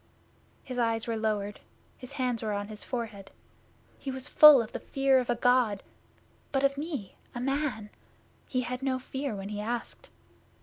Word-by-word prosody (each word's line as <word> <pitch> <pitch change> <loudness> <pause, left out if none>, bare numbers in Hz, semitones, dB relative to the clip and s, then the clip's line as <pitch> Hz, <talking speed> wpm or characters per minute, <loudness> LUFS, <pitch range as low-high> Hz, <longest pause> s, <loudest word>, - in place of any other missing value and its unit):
His 255 -1 -5
eyes 230 -1 +1
were 230 - -2
lowered, 210 -2 -2 0.4
his 255 - -11
hands 250 -4 +1
were 215 -1 -2
on 205 +1 -3
his 210 -1 -7
forehead. 225 -6 -5 0.7
He 275 - -6
was 260 -1 -5
full 300 -3 +9
of 230 -1 -3
the - - -5
fear 270 -1 +2
of 250 - -3
a 240 - +2
God, 240 -4 +2 0.7
but 270 -1 +1
of 275 0 +3
me, 285 - -5 0.2
a - - -3
man, 270 -5 -2 0.6
he 255 - 0
had 250 +1 -4
no 265 -1 0
fear 265 -1 -4
when 195 0 -6
he 210 0 -4
asked. 235 +2 -5
245 Hz, 175 wpm, -29 LUFS, 215-265 Hz, 0.7 s, full